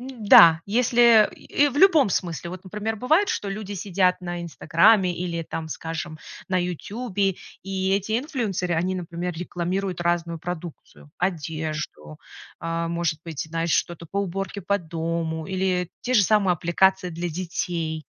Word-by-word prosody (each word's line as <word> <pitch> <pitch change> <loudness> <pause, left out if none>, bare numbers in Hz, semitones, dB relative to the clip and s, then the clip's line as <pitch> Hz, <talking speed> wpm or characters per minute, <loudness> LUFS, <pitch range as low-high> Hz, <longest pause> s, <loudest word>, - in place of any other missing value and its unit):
М-да! 210 -10 +6
Если, 235 0 +5
э, - - -14
и 290 0 +1
в 275 - -7
любом 320 - +6
смысле, 170 -2 -2
вот, 185 0 -8
например, 210 +3 -4
бывает, 315 - +2
что 200 - -2
люди 205 0 -5
сидят 185 -1 +1
на 175 -1 -5
"Инстаграмме" 175 +4 +3
или, 170 -2 -3
там, 160 0 -5
скажем, 160 0 -5 0.3
на 185 - 0
"Ютубе", 195 +2 -2 0.3
и 190 0 -2
эти 210 +3 -1
инфлюенсеры, 220 - -2
они, 180 +3 0
например, 175 0 -4
рекламируют 180 +2 -3
разную 170 -1 -1
продукцию: 160 - -8
одежду, 155 - -4 0.4
а, 165 0 -2
может 170 -1 -1
быть, 160 -4 -6
знаешь, 165 0 -1
что-то 170 -1 -1
по 200 +5 -4
уборке 195 +1 -3
по 200 +3 0
дому 165 -1 -3
или 185 -2 -1
те 255 - -2
же 210 - +6
самые 200 -2 +3
аппликации 180 +2 +2
для 170 +2 -4
детей. 165 -2 -3
180 Hz, 150 wpm, -24 LUFS, 165-200 Hz, 0.4 s, М-да